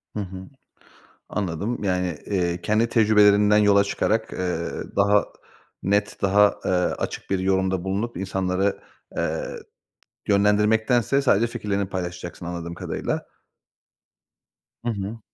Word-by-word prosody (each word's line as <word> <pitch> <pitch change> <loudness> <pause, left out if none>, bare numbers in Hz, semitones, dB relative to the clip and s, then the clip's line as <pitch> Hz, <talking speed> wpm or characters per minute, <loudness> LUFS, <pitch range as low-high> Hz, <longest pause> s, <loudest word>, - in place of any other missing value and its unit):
Hı 105 - -2
hı. 95 -1 -5 0.9
Anladım. 105 +4 -3
Yani, 90 -4 0
eee, 90 -3 -1
kendi 110 +5 +1
tecrübelerinden 105 -2 +5
yola 100 -1 +5
çıkarak, 110 +2 -1
eee, 90 -2 -2 0.3
daha 100 +1 +4 0.6
net, 100 +2 0
daha, 100 +1 +4
eee, - - +1
açık 90 -1 -1
bir 95 - +1
yorumda 95 -1 +1
bulunup 100 +5 -2
insanları, 95 +1 -1 0.4
eee, - - -2 0.7
yönlendirmektense 110 +6 +3
sadece 120 -3 +3
fikirlerini 100 -4 -2
paylaşacaksın 90 -1 -5
anladığım 85 -1 -5
kadarıyla. - - -3 1.6
Hı - - +1
hı. 105 +2 -5
100 Hz, 110 wpm, -24 LUFS, 90-105 Hz, 1.6 s, tecrübelerinden